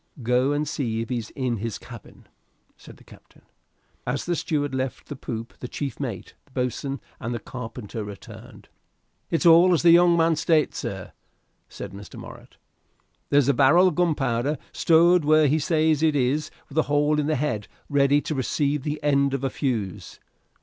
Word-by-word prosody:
"Go 125 +4 +2
and 145 +1 -1
see 115 -6 -2
if 115 - -6
he's 120 -3 -3
in 125 -4 -1
his 110 +1 -4
cabin," - - -13 0.5
said - - -15
the - - -19
captain. - - -19 0.6
As 125 +3 -2
the 175 - 0
steward 145 -3 -2
left 130 0 -4
the 145 - -5
poop 115 -3 -6
the 125 - -6
chief 135 -1 -5
mate, 135 -5 -5
the - - -29
boatswain, 130 +2 -3 0.2
and 120 -2 -5
carpenter 115 -3 -7
returned. 100 -3 -11 0.6
"It's 165 - 0
as 170 +1 +6
the 170 - +7
young 170 0 +6
man 165 0 +3
states, 155 -1 +1
sir," - - -6 0.6
said - - -8
Mr. 100 -3 -11
Morritt. - - -12 0.7
"There's 140 -2 +3
a 140 - +4
barrel 155 +8 +5
of - - -5
gunpowder 145 -5 0
stowed 170 +1 +4
where 155 +1 +4
he 150 +3 +2
says 155 -1 +1
it 155 -2 +2
is 145 +3 0 0.2
with 150 +2 -2
a 155 - 0
hole 145 +1 +2
in 150 - -1
the 155 - +1
head 125 -8 -2 0.2
ready 145 0 +3
to 155 - -4
receive 140 +2 -1
the 150 +2 -3
end 140 -1 +2
of 135 - -5
a 135 - -1
fuse." 110 - -3
140 Hz, 175 wpm, -24 LUFS, 125-155 Hz, 0.7 s, the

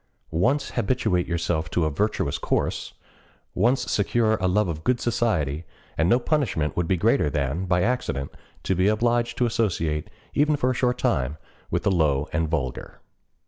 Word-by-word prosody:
Once 125 - +1
habituate 100 -6 0
yourself 85 -2 -1
to 85 0 +1
a 75 - 0
virtuous 75 -3 -1
course, - - -1 0.6
once 120 +8 +2
secure 110 +2 +2
a 95 - 0
love 105 +2 +2
of 80 -2 -4
good 125 -1 +1
society, 85 - 0 0.3
and 80 +2 +2
no 120 - +5
punishment 125 - 0
would 85 -1 0
be 95 - +2
greater 110 - +2
than, 75 +5 -1
by 90 -1 +2
accident, 110 - -1 0.3
to 95 - +1
be 90 +2 +2
obliged 120 +2 +1
to 125 - +2
associate, 85 -10 -1 0.2
even 150 +1 +3
for 130 -2 +1
a - - 0
short 125 0 +1
time, 75 - 0 0.3
with - - -1
the 100 - +2
low 75 -5 +2
and 80 0 0
vulgar. 65 -7 -3
95 Hz, 170 wpm, -25 LUFS, 80-120 Hz, 0.6 s, no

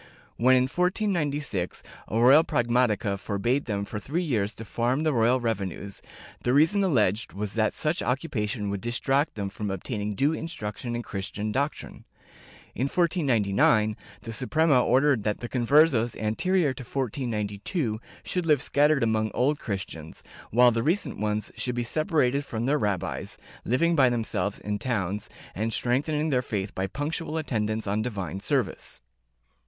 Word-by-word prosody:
When, 130 +2 +5
in 125 - +4
1496, 150 - -1 0.2
a 110 - -1
royal 135 +7 +7
pragmatica 120 - +1
forbade 120 +8 -1
them 100 -3 -2
for 105 - -5
three 155 - -2
years 110 - 0
to 115 - -8
farm 120 +7 0
the 155 -2 +2
royal 120 +2 +3
revenues, 100 -4 -3 0.4
the 125 +2 +1
reason 165 +8 +4
alleged 110 - +1
was 105 +1 -4
that 110 -1 +1
such 155 +3 -1
occupation 115 -6 -2
would 100 -1 -3
distract 135 +5 0
them 100 -2 -3
from 105 +1 -5
obtain 100 +4 -4
ing 105 +1 -2
due 145 +8 +2
instruction 120 -7 -5
in 120 - -3
Christian 105 +1 -4
doctrine. 140 +6 -3 0.7
In 130 - -1
1499, 115 - +2 0.3
the 115 - -7
Suprema 140 +2 +3
ordered 130 -1 +3
that 105 0 -1
the 120 - -5
Conversos 120 -2 +3
anterior 145 - +1
to 130 - -9
1492 115 - -2 0.2
should 180 -2 -2
live 150 -3 +5
scattered 145 -1 +3
among 110 -1 +1
Old 145 +4 +2
Christians, 95 -6 -6 0.3
while 125 +2 +6
the 115 0 0
recent 170 - 0
ones 105 0 -1
should 125 -1 -3
be 120 - -1
separated 145 0 +1
from 115 -4 -4
their 145 +3 +2
rabbis, 100 -6 -2 0.3
living 170 +8 +2
by 135 -4 +5
themselves 110 -4 -1
in 105 0 -3
towns 105 -4 -2 0.2
and 110 +4 -2
strengthening 150 +7 0
their 125 -2 +2
faith 100 -4 -3
by 95 +1 -2
punctual 155 - -3
attendance 110 -7 -1
on 105 +2 0
divine 95 -7 -4
service.' 115 - -2
120 Hz, 155 wpm, -26 LUFS, 105-145 Hz, 0.7 s, royal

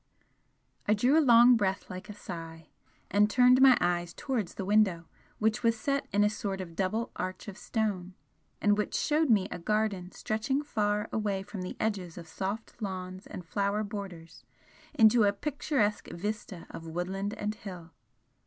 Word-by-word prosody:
I 210 - +4
drew 245 +7 +3
a 320 - +6
long 240 -2 +7
breath 200 -3 0
like 185 +3 -8
a - - -6
sigh, 165 -4 -8 0.4
and 205 +1 +4
turned 250 +3 +5
my 265 -2 +8
eyes 175 -1 0
towards 235 -10 -3
the 195 - -4
window, 195 -5 +3 0.3
which 220 +2 +1
was 230 -1 +2
set 275 0 -1
in 205 +1 +3
a - - +5
sort 200 -3 -3
of 170 -3 -7
double 215 +6 -1
arch 185 +2 -4
of 200 - -6
stone, 195 -5 -2 0.4
and 205 0 +3
which 210 - -1
showed 305 0 +2
me 205 -5 +4
a - - -5
garden 200 -1 -1
stretching 240 +7 -1
far 210 -6 0
away 205 -3 -1
from 205 -1 -7
the 180 - -6
edges 190 -6 -2
of 170 -2 -9
soft 200 +7 -5
lawns 185 -2 -5
and 180 - -8
flower 200 +4 0
borders 190 -6 -8 0.5
into 220 +1 +6
a 200 - +4
picturesque 255 -2 -1
vista 205 -1 -5
of 165 - -8
woodland 190 +5 -3
and 210 -1 -2
hill. 180 -5 -9
205 Hz, 170 wpm, -30 LUFS, 185-220 Hz, 0.5 s, my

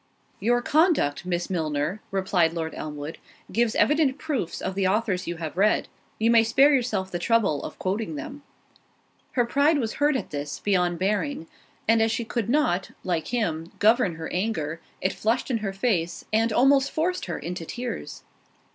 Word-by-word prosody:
"Your 240 +4 +2
conduct, 300 - +2
Miss 175 -1 -1
Milner," 160 +2 -2
replied 190 -4 +1
Lord 160 -1 -3
Elmwood 150 0 -6 0.3
"gives 235 -1 +1
evident 295 -2 +3
proofs 290 - -3
of 190 - -3
the 190 0 +1
authors 195 -2 0
you 170 - -2
have 160 -1 -5
read; 205 +3 +2 0.3
you 225 +1 +3
may 230 -1 +6
spare 270 +6 +5
yourself 215 -8 0
the 175 - -2
trouble 195 -6 +2
of - - -7
quoting 210 +9 -2
them." 295 -1 -7 0.9
Her 245 -2 +2
pride 285 +6 +3
was 230 -5 -1
hurt 295 0 +4
at 260 - -3
this, 145 0 -4
beyond 180 -4 +1
bearing; 210 - -1 0.4
and 225 0 +4
as 225 0 +3
she 230 +1 -2
could 230 -1 -2
not, 215 -10 +1
like 170 -4 -1
him, 170 -9 -2
govern 215 -4 +3
her 160 0 -6
anger, 170 -5 -2 0.2
it 185 - 0
flushed 230 +5 0
in 230 - +1
her 205 -2 -2
face, 195 -4 -1
and 225 +1 +3
almost 270 +4 +4
forced 350 +3 -1
her 175 - -4
into 170 +2 -5
tears. 245 +7 -6
210 Hz, 175 wpm, -25 LUFS, 175-245 Hz, 0.9 s, may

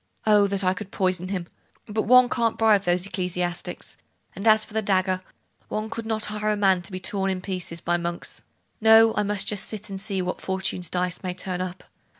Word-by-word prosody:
Oh, 210 -2 +5
that 200 0 -1
I 185 0 +3
could 190 +1 -8
poison 185 -2 0
him! 185 -2 -3 0.4
But 215 0 -2
one 250 +1 +7
can't 230 -2 0
bribe 215 -3 +4
those 175 +1 +2
ecclesiastics; 180 -2 -3 0.4
and 200 +4 -3
as 215 0 +6
for - - -15
the 220 - +1
dagger, 185 -2 +1 0.5
one 215 +1 -4
could 230 -1 -5
not 220 -1 0
hire 210 0 -2
a 210 - +2
man 190 -3 +3
to 175 - -10
be 185 - -4
torn 195 +1 -1
in 190 -1 -1
pieces 180 -3 -4
by 175 0 +1
monks. 170 0 -4 0.4
No; 225 0 +7
I - - +1
must 205 -1 0
just 205 -2 +1
sit 215 -2 -3
still, 200 - -7
and 190 - -2
see 195 -1 -2
what 180 - -4
Fortune's 190 -2 -2
dice 180 0 -2
may 180 -2 -4
turn 185 -1 -4
up. 185 0 -5
195 Hz, 215 wpm, -25 LUFS, 180-215 Hz, 0.5 s, one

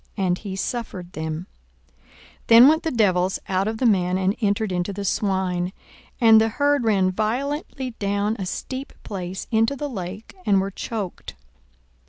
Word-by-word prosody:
And 180 -3 +1
he 195 -3 -6
suffered 195 -4 -4
them. 160 +2 -4 0.5
42:008:033 - - -37 0.5
Then 235 +3 +9
went 315 +2 +4
the 325 - -1
devils 190 - +2
out 190 +1 0
of 220 0 -2
the 255 - 0
man, 185 -4 +3
and 190 +2 +1
entered 205 0 +1
into 180 +2 -1
the 200 +1 -5
swine: 190 -2 0 0.5
and 225 -3 +7
the 225 - +2
herd 285 +3 +1
ran 195 -4 +3
violently 255 - -2
down 205 +1 0
a 190 - -3
steep 260 +7 -5
place 185 -2 -5
into 225 +4 +2
the 290 +2 -4
lake, 195 -2 -7
and 200 - +3
were 195 +1 -2
choked. 200 -2 -5
200 Hz, 165 wpm, -23 LUFS, 185-230 Hz, 0.5 s, Then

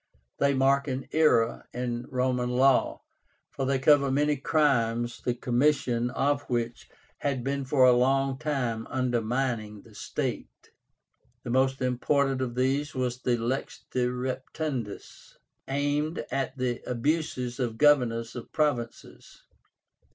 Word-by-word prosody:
They 140 0 +3
mark 135 +2 +3
an 130 0 -3
era 150 -8 +2
in 120 -1 -3
Roman 125 -1 0
law, 130 +1 +3 0.5
for 135 - -3
they 135 0 +2
cover 140 +1 +4
many 145 +2 +2
crimes 120 -5 +1
the 125 - -1
commission 125 -1 +1
of 140 +2 0
which 120 -1 -3 0.3
had 140 -4 -1
been 140 +1 -2
for 130 -1 +4
a 125 - +7
long 135 +2 +2
time 125 -7 -2
undermining 120 -4 -1
the - - -18
state. - - -5 0.7
The 120 - -4
most 130 +1 +1
important 135 +2 +1
of 120 -2 -3
these 135 +3 0
was 125 -1 -2
the 125 -2 +1
LEX 120 +4 -3
DE 125 -1 +1
REPETUNDIS, 130 -1 -5 0.3
aimed 145 +3 -1
at 135 0 -2
the 125 -2 -2
abuses 125 -1 -1
of 120 -3 -2
governors 120 -6 +3
of 120 - -8
provinces. 140 -7 -3
130 Hz, 130 wpm, -27 LUFS, 120-140 Hz, 0.7 s, a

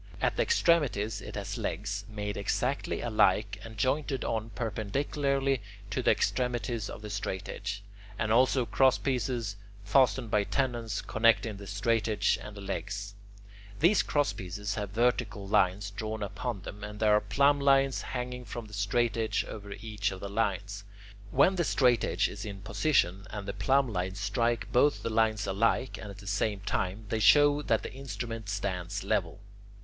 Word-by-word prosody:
At - - +1
the - - +1
extremities 145 - +2
it - - -8
has - - -4
legs, 100 0 -3
made 105 -1 -4
exactly 125 +7 -1
alike 105 -2 +2
and 110 -1 -10
jointed 135 +3 0
on 115 -1 -2
perpendicularly 135 +5 -1 0.3
to 130 - 0
the - - +2
extremities 120 -3 0
of 110 - -8
the 105 - -6
straightedge, 105 0 -4 0.4
and 110 - -1
also 130 +1 +4
crosspieces, 125 -4 +1 0.3
fastened 115 +1 +3
by 105 - +3
tenons, 120 -3 -1
connecting 115 -1 +2
the 100 0 -9
straightedge 105 +1 +1
and 105 -1 -9
the - - -7
legs. 100 +1 -4 0.7
These 175 +7 +5
crosspieces 105 -8 -1
have 105 -1 -3
vertical 110 -2 0
lines 100 +1 +2
drawn 110 +1 -4
upon 100 +1 -4
them, 105 +1 -8
and 105 0 -7
there 105 -1 +5
are 105 - +3
plumblines 140 -1 +3
hanging 125 0 -4
from 120 0 -7
the 105 - -14
straightedge 110 +2 0
over 100 -1 -8
each 100 0 -3
of 95 - -7
the 100 - -6
lines. 100 -1 -1 0.5
When 140 - +4
the 170 - +2
straightedge 125 -6 +2
is - - -7
in 100 -2 -7
position, 100 - +1
and 105 -1 -6
the 100 - -3
plumblines 100 -4 +1
strike 115 +4 0
both 145 +4 +3
the 115 - -2
lines 110 -1 +2
alike 115 +6 +1
and 105 - -7
at 100 - -9
the 100 - -12
same 100 0 -1
time, 100 +2 -2
they 110 - 0
show 145 +5 +6
that 115 -6 +1
the - - -6
instrument 115 -4 -5
stands 100 -1 -3
level. 95 -1 -1
110 Hz, 155 wpm, -30 LUFS, 100-125 Hz, 0.7 s, show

